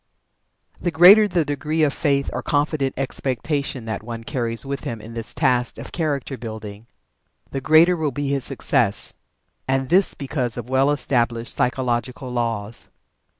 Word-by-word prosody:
The 175 - 0
greater 190 +6 +8
the 175 -5 +1
degree 150 +3 -1
of 145 -2 +2
faith 140 -2 0
or - - -2
confident 145 -2 0
expectation 135 0 -2
that 110 -2 -4
one 115 +1 -7
carries 115 -1 -2
with 140 0 -4
him 115 -2 -4
in 110 +2 -10
this 115 -1 -6
task 125 -1 +1
of - - -9
character 145 -5 -2
building, 110 -2 -8 0.6
the 135 - -3
greater 160 +5 +5
will 160 -3 -1
be 145 +1 -3
his 140 -1 -1
success. 125 -5 0 0.5
And 135 0 0
this 185 +3 +3
because 130 -5 -3
of 120 +1 -6
well 135 +2 +3
established 120 -5 0
psychological 125 0 -1
laws. 115 -3 -3
135 Hz, 150 wpm, -22 LUFS, 120-145 Hz, 0.6 s, greater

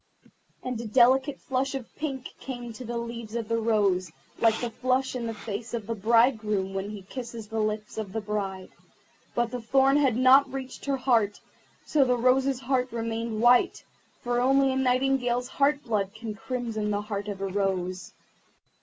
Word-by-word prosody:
And 250 -3 -3
a 235 - -5
delicate 265 +4 +4
flush 265 +1 -1
of 255 -4 -7
pink 275 -4 -4
came 250 -2 -6
into 240 +1 -8
the 240 0 -4
leaves 235 -1 -6
of 230 -2 -2
the 230 0 0
rose, 200 -6 +1 0.3
like 225 -1 +3
the 240 -1 -3
flush 255 +3 0
in 235 -2 -3
the 225 - -3
face 220 +2 -5
of 225 -3 -4
the 230 - -2
bridegroom 215 -3 +2
when 195 +1 -3
he 210 -2 -8
kisses 230 +1 -7
the 220 +1 -3
lips 215 0 -2
of 205 -3 -5
the 220 - -2
bride. 200 -3 -4 0.6
But 240 -1 +1
the 250 -1 -4
thorn 270 +4 +4
had 270 -5 +3
not 260 +2 +6
yet 265 - -9
reached 265 -1 -6
her 275 -1 0
heart, 230 -6 +2 0.5
so 295 -3 +3
the 250 -1 +2
rose's 260 +2 +2
heart 255 0 0
remained 230 -1 -3
white, 245 +1 +4 0.4
for 245 0 0
only 270 +1 +4
a - - -2
Nightingale's 255 -1 +1
heart's 285 +2 +1
blood 200 -3 -1
can 220 -1 -5
crimson 225 -2 -3
the 205 0 0
heart 205 -1 -4
of 200 -2 -5
a 195 - -2
rose. 185 -2 -2
235 Hz, 185 wpm, -27 LUFS, 215-255 Hz, 0.6 s, not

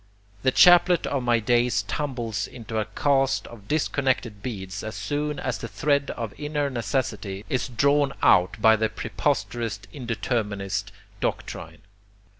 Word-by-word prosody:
The 130 - +3
chaplet 175 +4 +6
of 140 - -1
my 120 -1 +3
days 120 -2 +2
tumbles 115 -3 -3
into 115 -2 -5
a 105 - -1
cast 135 +4 +1
of 105 -4 -12
disconnected 130 -8 0
beads 95 -5 -5
as 110 +1 -5
soon 150 0 -2
as 130 - -2
the 115 - -5
thread 140 +2 0
of 115 -4 -4
inner 145 -1 -1
necessity 110 -5 -2
is 130 -1 0
drawn 140 +3 +2
out 90 +4 +4
by 110 +1 +6
the 110 0 +1
preposterous 115 -3 -2
indeterminist 110 -5 -2 0.3
doctrine. - - -4
120 Hz, 135 wpm, -25 LUFS, 105-140 Hz, 0.3 s, chaplet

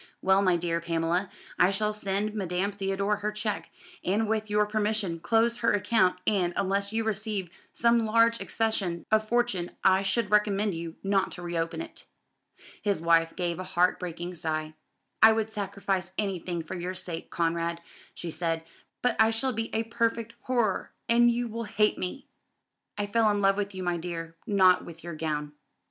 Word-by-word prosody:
Well, 190 +1 +4
my 185 -3 +3
dear 170 0 -1
Pamela, 170 +3 0 0.3
I 180 - +6
shall 210 +2 0
send 205 0 -1
Madame 190 -1 -1
Theodore 200 +1 -1
her 210 +1 -2
cheque, 210 -6 -3 0.3
and 210 +4 +1
with 215 0 -1
your 210 0 +3
permission 210 -4 -1
close 230 +6 +2
her 230 - +2
account; 205 -2 +2
and, 180 -5 +1
unless 200 +1 0
you 225 +1 0
receive 210 -4 -2 0.2
some 235 0 +3
large 230 +1 +3
accession 195 -7 -1
of 215 0 +2
fortune 240 -8 +1
I 190 0 +5
should 200 +2 0
recommend 210 -1 +2
you 165 0 -6
not 195 -1 +2
to 175 - -8
reopen 165 -1 -2
it." - - -11 0.7
His 200 -4 +1
wife 165 0 +3
gave 175 -1 -2
a - - -3
heart 180 0 +2
breaking 175 0 -5
sigh. 155 -2 -3 0.5
"I 220 0 +9
would 220 0 -1
sacrifice 195 -2 -2
anything 185 -4 -2
for 160 - -7
your 180 0 -4
sake, 170 -3 -3
Conrad," 170 0 -1 0.4
she 170 - -4
said, 165 0 -1 0.4
"but 245 -2 +2
I 220 0 +6
shall 250 +4 0
be 225 +1 -3
a 225 - 0
perfect 230 0 -1
horror, 240 -6 0
and 240 +1 +5
you 240 0 0
will 230 +1 -5
hate 210 0 +1
me." 185 +10 -4 0.7
"I 205 - 0
fell 220 +1 +3
in 205 -1 +1
love 195 -1 +4
with 200 -1 -3
you, 185 - -4
my 175 -1 0
dear, 165 -1 -5
not 190 -3 +5
with 165 -1 -11
your 170 0 -6
gown." 150 -2 -3
195 Hz, 175 wpm, -28 LUFS, 175-215 Hz, 0.7 s, I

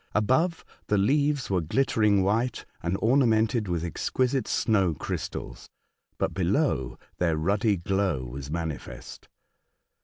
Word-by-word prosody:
Above, 145 - +1 0.2
the 105 - +2
leaves 140 +4 +1
were 90 -2 +2
glittering 105 - +2
white 115 +5 0 0.2
and 85 +3 -1
ornamented 115 -3 +3
with 85 -2 -1
exquisite 130 - -1
snow 95 -7 +2
crystals; - - -5 0.5
but - - -1
below, 95 - 0 0.2
their 85 -3 +1
ruddy 100 +5 +1
glow 95 -5 0
was 65 +3 -7
manifest. 80 -2 -6
100 Hz, 115 wpm, -27 LUFS, 85-120 Hz, 0.5 s, ornamented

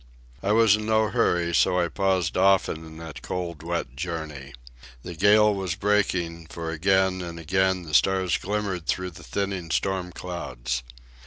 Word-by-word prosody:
I 100 - 0
was 110 -1 +5
in 110 0 -5
no 110 -1 +3
hurry, 85 -8 +1
so 90 +2 +3
I 85 - +2
paused 95 -3 0
often 95 -4 +3
in 80 0 -12
that 80 -2 -9
cold, 85 -4 -4
wet 85 -6 -3
journey. 75 -5 -5 0.5
The 90 - -6
gale 105 +5 +5
was 95 -3 -2
breaking, 95 -5 0
for 80 0 -5
again 95 +3 +2
and 85 -1 -6
again 95 +2 +1
the 75 -2 -9
stars 95 +6 +3
glimmered 95 -3 -3
through 90 0 -1
the 80 - -13
thinning 100 -4 -3
storm 95 +1 -1
clouds. 65 -10 -4
90 Hz, 160 wpm, -25 LUFS, 80-95 Hz, 0.5 s, was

